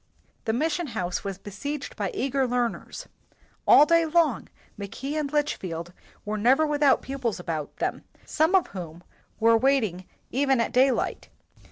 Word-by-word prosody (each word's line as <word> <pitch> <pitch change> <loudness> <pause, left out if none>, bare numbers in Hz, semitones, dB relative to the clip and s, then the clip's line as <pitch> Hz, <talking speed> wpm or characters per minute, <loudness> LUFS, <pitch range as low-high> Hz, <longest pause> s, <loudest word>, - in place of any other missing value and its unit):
The 220 - 0
mission 315 +6 0
house 180 -2 -2
was 195 -2 -4
be 205 +1 -10
seiged 285 +8 -5
by - - -2
eager 275 - 0
learners. 245 -1 -3 0.6
All 295 - +8
day 335 +1 +4
long 320 -5 +1 0.3
Mackay 215 +8 -6
and 300 -2 -2
Litchfield 180 - -2 0.3
were 210 0 -2
never 260 +8 +4
without 290 -2 +3
pupils 260 -7 -3
about 160 -4 -4
them, - - -2 0.2
some 320 +5 +2
of 370 - +4
whom 175 -3 -8 0.4
were 230 0 +5
wait 270 +2 +3
ing 185 -3 -5 0.3
even 270 0 +2
at 230 - 0
daylight. 255 +1 +1
255 Hz, 155 wpm, -26 LUFS, 200-295 Hz, 0.6 s, All